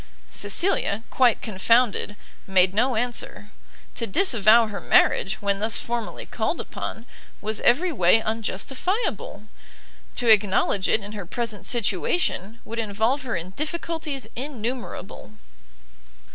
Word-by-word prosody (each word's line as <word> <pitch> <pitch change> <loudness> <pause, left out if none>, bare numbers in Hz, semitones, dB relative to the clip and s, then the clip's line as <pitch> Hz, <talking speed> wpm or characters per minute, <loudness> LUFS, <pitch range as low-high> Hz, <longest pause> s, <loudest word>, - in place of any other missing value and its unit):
Cecilia, 210 - -1
quite 250 -4 +3
confounded, 220 +1 +1 0.3
made 190 -1 +3
no 245 +4 +1
answer: 225 -2 -4 0.4
to 230 - -3
disavow 230 - +5
her 210 -2 -6
marriage, 195 -1 +3
when 200 -1 0
thus 220 +2 +7
formally 235 -1 -3
called - - -3
upon, 225 - -6 0.3
was 215 0 -2
every 330 +10 +3
way 185 - +4
unjustifiable; 225 - -3 0.7
to 245 - -2
acknowledge 200 -2 +3
it 220 - +3
in 205 - -8
her 200 -5 -7
present 230 0 -4
situation, 225 - -1
would 230 +1 -6
involve 220 +5 0
her 250 -5 -4
in 175 +2 -5
difficulties 310 - -4
innumerable. 240 - -6
225 Hz, 115 wpm, -24 LUFS, 200-250 Hz, 0.7 s, thus